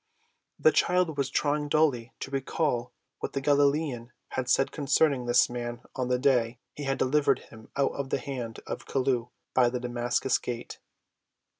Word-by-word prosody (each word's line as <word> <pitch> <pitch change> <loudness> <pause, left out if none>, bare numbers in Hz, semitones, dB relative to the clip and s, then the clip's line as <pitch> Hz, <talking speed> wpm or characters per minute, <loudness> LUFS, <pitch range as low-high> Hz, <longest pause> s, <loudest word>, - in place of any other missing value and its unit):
The 470 - +5
child 180 -3 +2
was 140 -2 -1
trying 145 +1 0
dully 140 -6 +2
to 135 - -5
recall 135 -2 -1 0.3
what - - -4
the 140 - 0
Galilean 140 -3 +1 0.2
had 130 -1 -3
said 135 - +3
concerning 140 -3 +2
this 120 - +5
man 120 0 -5
on 130 -1 -1
the 125 0 +2
day 125 -3 +2 0.2
he 145 - -6
had 135 0 0
delivered 145 +3 +3
him 110 -1 -15
out 140 -1 +2
of 140 -1 -4
the - - +1
hand 125 -5 -5
of - - -6
Chelluh 125 -3 0 0.2
by 125 -2 +4
the 125 +1 -3
Damascus 120 +1 0
gate. 120 -1 -6
130 Hz, 165 wpm, -28 LUFS, 120-145 Hz, 0.3 s, The